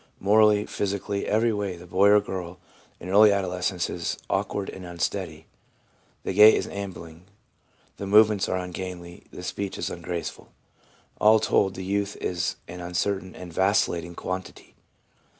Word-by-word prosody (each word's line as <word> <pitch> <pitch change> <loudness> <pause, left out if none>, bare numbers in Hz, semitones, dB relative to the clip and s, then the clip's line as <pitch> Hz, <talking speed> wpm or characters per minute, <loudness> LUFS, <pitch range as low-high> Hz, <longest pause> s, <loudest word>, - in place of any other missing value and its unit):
Morally, 105 +1 +4
physically, 100 0 -3
every 110 +2 +2
way, 100 -3 -3
the 85 - -12
boy 95 +3 +3
or 105 0 +7
girl 90 -3 -6 0.4
in 90 - -9
early 105 +2 +7
adolescence 90 -2 -1
is 85 -1 -3
awkward 100 -1 -1
and 95 - -8
unsteady. 90 -2 -4 0.8
The - - -3
gait 105 +3 +8
is - - -1
ambling, 90 -4 -8 0.7
the 100 - -5
movements 105 0 +4
are 95 - 0
ungainly, 90 -1 -7
the 90 - -10
speech 100 +1 -4
is - - -3
ungraceful. 85 0 -6 0.7
All 110 +1 +6
told, 95 -2 +1
the 95 - -6
youth 100 +1 -1
is 90 -1 -2
an 90 +1 -8
uncertain 95 +2 -2
and 90 -2 -9
vacillating 85 -2 +1
quantity. 95 +1 -6
95 Hz, 145 wpm, -25 LUFS, 90-100 Hz, 0.8 s, gait